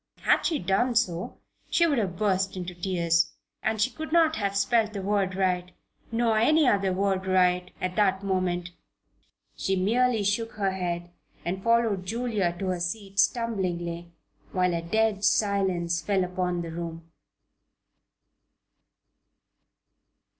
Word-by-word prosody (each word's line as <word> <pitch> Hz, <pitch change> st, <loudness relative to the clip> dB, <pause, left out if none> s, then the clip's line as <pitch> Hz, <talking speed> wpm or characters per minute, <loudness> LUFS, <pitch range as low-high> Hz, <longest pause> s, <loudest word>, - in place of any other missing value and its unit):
Had -, -, +3 dB
she 320 Hz, -, 0 dB
done 215 Hz, +6 st, +1 dB
so 180 Hz, -7 st, 0 dB, 0.3 s
she 340 Hz, -, +3 dB
would 290 Hz, -6 st, +2 dB
have 185 Hz, -5 st, -2 dB
burst 190 Hz, -1 st, 0 dB
into 180 Hz, 0 st, -5 dB
tears. 170 Hz, -2 st, +1 dB, 0.3 s
And 220 Hz, 0 st, -1 dB
she 225 Hz, +5 st, +2 dB
could 315 Hz, -1 st, -7 dB
not 325 Hz, -1 st, +4 dB
have 200 Hz, -1 st, -1 dB
spelled 215 Hz, +1 st, +2 dB
the 200 Hz, -, -4 dB
word 195 Hz, -2 st, 0 dB
right 180 Hz, -2 st, 0 dB, 0.4 s
nor 230 Hz, -1 st, +2 dB
any 305 Hz, +5 st, +4 dB
other 200 Hz, -4 st, +2 dB
word 190 Hz, 0 st, 0 dB
right 180 Hz, -1 st, +2 dB
at 185 Hz, 0 st, -3 dB
that 195 Hz, -2 st, +2 dB
moment. 185 Hz, -2 st, -1 dB, 0.8 s
She 195 Hz, -, -1 dB
merely 225 Hz, +4 st, +2 dB
shook 220 Hz, +3 st, -1 dB
her 200 Hz, -2 st, 0 dB
head 175 Hz, -2 st, -3 dB, 0.3 s
and 185 Hz, +2 st, -2 dB
followed 230 Hz, -5 st, +2 dB
Julia 220 Hz, -6 st, -1 dB
to 190 Hz, +1 st, -2 dB
her 180 Hz, -1 st, -1 dB
seat, 195 Hz, +3 st, -4 dB
stumblingly, 175 Hz, -7 st, 0 dB, 0.4 s
while 180 Hz, -1 st, +1 dB
a 170 Hz, -, -1 dB
dead 210 Hz, +3 st, 0 dB
silence 190 Hz, -5 st, +1 dB
fell 195 Hz, -2 st, +1 dB
upon 180 Hz, -1 st, -2 dB
the 165 Hz, -, -6 dB
room. 165 Hz, 0 st, -7 dB
190 Hz, 140 wpm, -27 LUFS, 180-220 Hz, 0.8 s, not